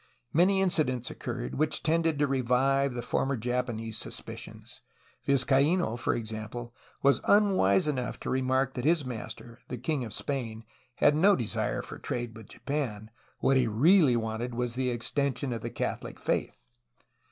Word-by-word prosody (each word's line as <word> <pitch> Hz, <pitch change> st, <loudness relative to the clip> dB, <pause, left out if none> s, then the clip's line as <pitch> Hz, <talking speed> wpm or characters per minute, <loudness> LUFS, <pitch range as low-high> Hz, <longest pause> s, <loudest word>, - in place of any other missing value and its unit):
Many 190 Hz, +4 st, +4 dB
incidents 150 Hz, -10 st, +1 dB
occurred -, -, -5 dB
which 155 Hz, +1 st, 0 dB
tended 165 Hz, -1 st, +2 dB
to 145 Hz, -, +3 dB
revive 135 Hz, 0 st, +2 dB
the 120 Hz, -, -3 dB
former 135 Hz, +2 st, 0 dB
Japanese 115 Hz, -2 st, -2 dB
sus -, -, -5 dB
picions. -, -, -10 dB, 0.5 s
Vizcaino, 140 Hz, +2 st, +3 dB
for 120 Hz, -, 0 dB
example, 115 Hz, +1 st, -6 dB, 0.3 s
was 140 Hz, 0 st, +4 dB
unwise 190 Hz, -, +4 dB
enough 130 Hz, -4 st, -2 dB
to -, -, -3 dB
re 130 Hz, -, +1 dB
mark 130 Hz, +1 st, +1 dB
that 125 Hz, -, -4 dB
his 155 Hz, 0 st, +2 dB
master, 115 Hz, -1 st, -7 dB
the 125 Hz, -, -5 dB
king 135 Hz, +2 st, -1 dB
of 115 Hz, -, -6 dB
Spain, 115 Hz, -6 st, -3 dB, 0.3 s
had 145 Hz, -, +4 dB
no 190 Hz, +7 st, +5 dB
desire 120 Hz, -5 st, -2 dB
for -, -, -8 dB
trade 120 Hz, -2 st, -4 dB
with 110 Hz, -2 st, -12 dB
Japan; 115 Hz, -7 st, -4 dB, 0.3 s
what 135 Hz, -, +4 dB
he 125 Hz, -2 st, +3 dB
really 140 Hz, -, +5 dB
wanted 115 Hz, +1 st, -2 dB
was 120 Hz, -1 st, -1 dB
the 130 Hz, +1 st, 0 dB
extension 130 Hz, +2 st, -1 dB
of 115 Hz, -, -4 dB
the -, -, -4 dB
Catholic -, -, -4 dB
faith. -, -, -1 dB
125 Hz, 160 wpm, -29 LUFS, 115-145 Hz, 0.5 s, no